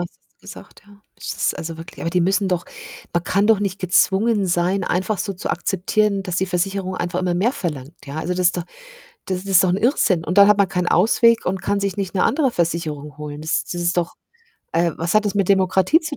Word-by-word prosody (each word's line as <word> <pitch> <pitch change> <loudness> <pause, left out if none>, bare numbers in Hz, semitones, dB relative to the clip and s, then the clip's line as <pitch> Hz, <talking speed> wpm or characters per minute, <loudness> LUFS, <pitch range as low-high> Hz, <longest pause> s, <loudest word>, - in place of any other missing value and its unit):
hast 175 - -7 0.2
du - - -43 0.2
gesagt, - - -16
ja. 205 0 -19
Es - - -5
ist, - - -1
also, 165 0 -5
wirklich 165 +1 -11
aber 165 - -2
die 180 +1 +1
müssen 195 +2 +1
doch 180 -1 -1 0.5
man 170 0 0
kann 200 +3 +1
doch 220 -2 +4
nicht 195 -1 -2
gezwungen 195 +3 +2
sein, 180 +2 0
einfach 185 +2 -1
so 200 - -2
zu 185 - -6
akzeptieren, 200 +1 0
dass 180 -2 -4
die 190 - 0
Versicherung 185 +1 -2
einfach 175 +1 -2
immer 180 -1 0
mehr 210 +9 +1
verlangt, 150 - -5
ja? 140 +1 -8
Also, 165 +3 -2
das 180 0 +1
ist 180 - -3
doch 175 - -3 0.6
das 185 0 -3
ist 195 -1 +4
doch 185 - +2
'n 180 - +1
Irrsinn. 200 - +1
Und 180 +5 0
dann 200 - +9
hat 210 -1 +4
man 200 -2 +3
keinen 180 -1 -1
Ausweg 230 +5 +3
und 185 +1 -1
kann 200 0 0
sich 200 -2 -2
nicht 195 -2 -4
'ne 190 - +1
andere 280 -3 +2
Versicherung 155 -6 -3
holen. 150 -1 -7
Das 155 +1 -1
das 175 - -5
ist 175 +1 0
doch 175 -1 -1 0.6
äh, 170 +1 +2
was 170 +3 -2
hat 215 0 +4
das 205 - -1
mit 200 -3 0
Demokratie 190 - +3
zu 310 -3 -5
185 Hz, 240 wpm, -21 LUFS, 175-200 Hz, 0.6 s, dann